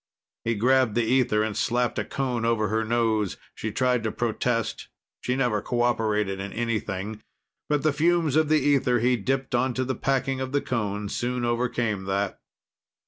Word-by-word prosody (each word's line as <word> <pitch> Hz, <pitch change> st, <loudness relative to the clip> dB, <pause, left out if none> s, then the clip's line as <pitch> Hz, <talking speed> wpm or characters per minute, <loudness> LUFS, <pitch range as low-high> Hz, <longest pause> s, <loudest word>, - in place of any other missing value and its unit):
He 115 Hz, 0 st, 0 dB
grabbed 125 Hz, 0 st, +3 dB
the 120 Hz, -, +3 dB
ether 115 Hz, -3 st, +2 dB
and 110 Hz, -1 st, -2 dB
slapped 120 Hz, 0 st, 0 dB
a -, -, 0 dB
cone 125 Hz, -4 st, -2 dB
over 115 Hz, -2 st, +1 dB
her 110 Hz, +1 st, +1 dB
nose. 110 Hz, -3 st, 0 dB, 0.2 s
She 110 Hz, -, -4 dB
tried 125 Hz, +1 st, +1 dB
to 110 Hz, 0 st, -2 dB
protest; 115 Hz, 0 st, -1 dB, 0.3 s
she 125 Hz, -, -1 dB
never 120 Hz, -6 st, +1 dB
cooperated 110 Hz, -4 st, 0 dB
in 100 Hz, +1 st, -5 dB
anything. 110 Hz, -3 st, -3 dB, 0.5 s
But 150 Hz, -2 st, +1 dB
the 155 Hz, -2 st, +3 dB
fumes 165 Hz, -1 st, +2 dB
of 155 Hz, -1 st, +3 dB
the 155 Hz, -, +5 dB
ether 135 Hz, -3 st, +3 dB
he 125 Hz, +2 st, +3 dB
dipped 130 Hz, +4 st, -2 dB
onto 130 Hz, +1 st, +1 dB
the 130 Hz, +1 st, -1 dB
packing 135 Hz, 0 st, -1 dB
of 130 Hz, +1 st, -4 dB
the 145 Hz, -, +2 dB
cone 105 Hz, -4 st, -2 dB
soon 120 Hz, +3 st, -2 dB
overcame 120 Hz, -4 st, -1 dB
that. 100 Hz, 0 st, -1 dB
120 Hz, 170 wpm, -26 LUFS, 110-130 Hz, 0.5 s, the